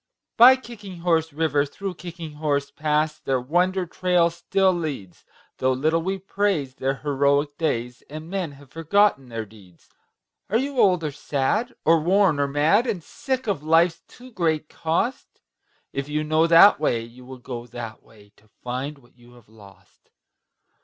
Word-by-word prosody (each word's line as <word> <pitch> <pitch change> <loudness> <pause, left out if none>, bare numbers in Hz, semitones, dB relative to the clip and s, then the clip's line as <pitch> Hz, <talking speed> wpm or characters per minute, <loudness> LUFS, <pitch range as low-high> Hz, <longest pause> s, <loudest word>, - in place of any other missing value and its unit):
By 250 +3 +9
Kicking 205 -8 -11
Horse 165 -2 +1
River, 150 -1 +1
through 190 +7 -6
Kicking 170 -3 -9
Horse 140 -2 0
Pass, 150 +1 -1
Their 130 -1 -1
wonder 180 +8 0
trail 175 -1 +1
still 190 +2 +1
leads, 145 - -5 0.4
Though 130 0 +2
little 155 +5 +1
we 190 +3 -2
praise 195 -8 -1
their 135 +1 -2
heroic 145 +1 0
days 125 -6 -2
And 155 +2 -8
men 180 -5 -3
have 140 -1 -17
forgotten 165 -4 +1
their 115 -1 -5
deeds. 100 -5 -20 0.6
Are 215 - +2
you 270 +1 -2
old 180 -6 +4
or 150 - -2
sad 145 - -1
or 165 +1 +5
worn 180 -1 +2
or 140 - +2
mad, 155 - +2
And 195 -8 -3
sick 260 - -4
of 200 -9 -1
life's 165 +2 +3
too 255 +1 -15
great 160 -7 -1
cost? 170 +10 -2 0.5
If 140 +1 -4
you 150 +1 -1
know 155 +2 +2
that 170 +3 +7
way, 120 -7 0
you 120 +2 -14
will 130 +1 -10
go 120 -1 -8
that 115 -2 -8
way, 105 -2 -21
To 110 - -26
find 130 +7 -6
what 120 -3 -24
you 120 0 -19
have 120 -3 -20
lost. 100 -3 -19
155 Hz, 165 wpm, -23 LUFS, 135-180 Hz, 0.6 s, By